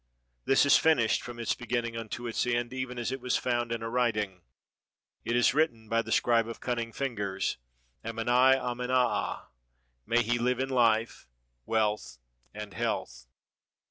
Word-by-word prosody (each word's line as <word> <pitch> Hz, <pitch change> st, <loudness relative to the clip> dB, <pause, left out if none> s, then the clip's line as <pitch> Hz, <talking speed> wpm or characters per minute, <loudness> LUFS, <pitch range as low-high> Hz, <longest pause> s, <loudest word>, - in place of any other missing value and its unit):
This 135 Hz, -, +4 dB
is 140 Hz, -, +7 dB
finished 130 Hz, -9 st, +3 dB
from 120 Hz, -1 st, -8 dB
its 115 Hz, -1 st, 0 dB
beginning 120 Hz, -2 st, -3 dB
unto 115 Hz, +1 st, -5 dB
its 120 Hz, +1 st, -1 dB
end, 120 Hz, 0 st, -1 dB
even 130 Hz, -1 st, -4 dB
as 120 Hz, 0 st, -2 dB
it 135 Hz, -1 st, -4 dB
was 125 Hz, -1 st, 0 dB
foimd 120 Hz, -2 st, -1 dB
in 115 Hz, -1 st, -3 dB
a -, -, -3 dB
writing. 110 Hz, -6 st, -1 dB, 0.8 s
It 120 Hz, -, -1 dB
is 120 Hz, -1 st, +4 dB
written 125 Hz, -7 st, 0 dB
by 115 Hz, 0 st, +2 dB
the -, -, -8 dB
scribe 115 Hz, -2 st, +3 dB
of 115 Hz, -, -7 dB
cunning 120 Hz, -2 st, -2 dB
fingers, 100 Hz, -8 st, -2 dB, 0.5 s
Ameni 120 Hz, +4 st, +3 dB
amenaa; 125 Hz, 0 st, -1 dB, 0.6 s
may 120 Hz, +1 st, +3 dB
he 120 Hz, +2 st, 0 dB
live 125 Hz, +1 st, +1 dB
in 135 Hz, 0 st, -1 dB
life, 115 Hz, -, +1 dB, 0.4 s
wealth, 105 Hz, -, 0 dB, 0.3 s
and 105 Hz, -2 st, -8 dB
health! -, -, -3 dB
120 Hz, 155 wpm, -29 LUFS, 115-125 Hz, 0.8 s, is